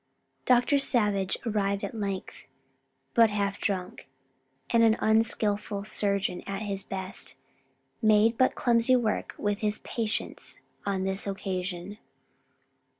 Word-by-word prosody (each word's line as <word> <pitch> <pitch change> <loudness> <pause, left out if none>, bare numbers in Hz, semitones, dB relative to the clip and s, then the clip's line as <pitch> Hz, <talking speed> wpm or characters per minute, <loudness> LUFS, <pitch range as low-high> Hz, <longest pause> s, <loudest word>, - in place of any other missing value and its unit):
Dr. 250 +3 +4
Savage 205 -8 +1
arrived 200 -3 0
at - - -4
length, 200 -4 -5 0.7
but 230 -2 +6
half 200 -1 -1
drunk, 190 - -3 0.6
and, 235 - +4
an 225 0 +5
unskillful 210 -2 +1
surgeon 200 -3 -1
at 195 +1 -3
his 195 -2 -1
best, 190 0 -5 0.7
made 215 +1 +4
but 255 +2 +2
clumsy 235 +1 +4
work 230 -4 -1
with 205 0 -1
his 210 -1 0
patients 225 -2 -3 0.3
on 195 -1 0
this 190 +1 0
occasion. 190 0 -4
205 Hz, 115 wpm, -28 LUFS, 195-225 Hz, 0.7 s, but